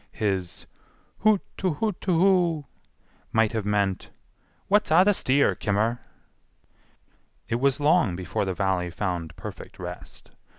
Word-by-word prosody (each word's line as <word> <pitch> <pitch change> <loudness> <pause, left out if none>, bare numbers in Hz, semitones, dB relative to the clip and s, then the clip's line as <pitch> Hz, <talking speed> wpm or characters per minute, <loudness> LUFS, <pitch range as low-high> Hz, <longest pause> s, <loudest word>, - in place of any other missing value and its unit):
His 95 -4 -2 0.5
"hoot 215 -2 +4 0.2
too 185 -4 0
hoot 210 +1 -2
too 180 -4 +1
whoo" 175 -5 +3 0.7
might 110 -1 +3
have 110 -3 -3
meant, 100 -2 0 0.6
"what's 210 +2 +3
a' 165 +4 +6
the 205 - +5
steer, 140 -5 +2
kimmer?" 110 +3 0 1.5
It 115 - -1
was 135 +2 +2
long 145 - +3
before 90 +2 -2
the 95 -1 -2
Valley 95 -1 0
found 85 -3 -4
perfect - - -9
rest. - - -9
115 Hz, 130 wpm, -25 LUFS, -, 1.5 s, a